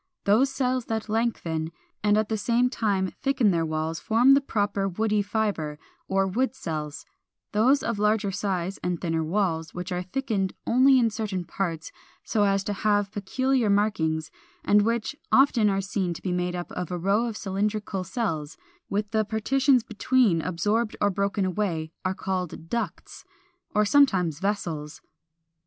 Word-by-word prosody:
Those 225 +7 +4
cells 255 -2 -1
that 220 -1 -3
lengthen, 170 -8 -1 0.3
and 210 0 +4
at 215 0 +1
the 220 - -1
same 240 +3 +1
time 195 -6 0
thicken 265 -6 +2
their 165 -2 +1
walls 155 0 -2
form 235 - +4
the 275 - +5
proper 205 -6 -1
WOODY 210 +2 +1
FIBRE 205 -8 -2 0.3
or 195 0 +2
WOOD 245 +6 0
CELLS; 155 - -5 0.5
those 255 +7 +3
of 230 -3 -2
larger 210 -1 +2
size 190 -1 -2
and 180 -1 -2
thinner 165 -2 -1
walls, 165 -2 -1
which 180 +2 -5
are 180 0 -1
thickened 195 -1 -2
only 260 +2 +5
in 230 -3 +3
certain 205 -4 -3
parts 165 -2 -3 0.3
so 210 -2 +1
as 195 -1 +2
to 205 - -2
have 205 0 +1
peculiar 245 +4 0
markings, 160 -7 +1 0.3
and 205 0 +5
which 230 +4 -1 0.2
often 255 -6 +5
are 195 0 +1
seen 190 -2 -2
to - - -9
be 185 - -1
made 180 0 -1
up 175 0 -5
of 180 -2 -4
a 180 - -3
row 200 +6 +1
of 225 -2 -5
cylindrical 200 0 -2
cells, 170 -6 -3 0.3
with 205 +1 -2
the 220 -1 +2
partitions 255 +4 +2
between 220 -5 +2
absorbed 210 +7 -1
or 205 - +2
broken 200 0 0
away, 175 -4 -2
are 185 0 -1
called 180 -4 -4
DUCTS, 235 - -4 0.5
or 210 0 +4
sometimes 190 - +3
VESSELS. 165 -7 -3
205 Hz, 160 wpm, -26 LUFS, 180-225 Hz, 0.5 s, the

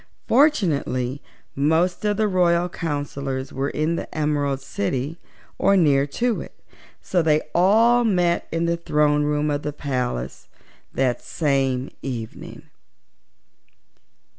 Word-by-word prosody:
Fortunately 155 - +2 0.3
most 160 +7 +1
of 205 -1 +1
the 215 -1 +2
royal 175 -2 +2
counsellors 140 -5 -4
were 135 +2 -1
in 160 +2 -1
the - - -6
Emerald 145 -3 0
City 135 - -3 0.4
or 195 0 +4
near 140 -5 +3
to 230 - -1
it, - - -12 0.4
so 180 - +1
they 155 -1 +2
all 225 +7 +4
met 180 -6 +1
in 165 +1 0
the 170 0 0
throne 150 -2 +2
room 150 0 0
of 145 0 -1
the 150 - -3
palace 125 - -4 0.4
that 130 -2 0
same 135 -2 -1
evening. 120 -5 -7
150 Hz, 120 wpm, -23 LUFS, 135-175 Hz, 0.4 s, or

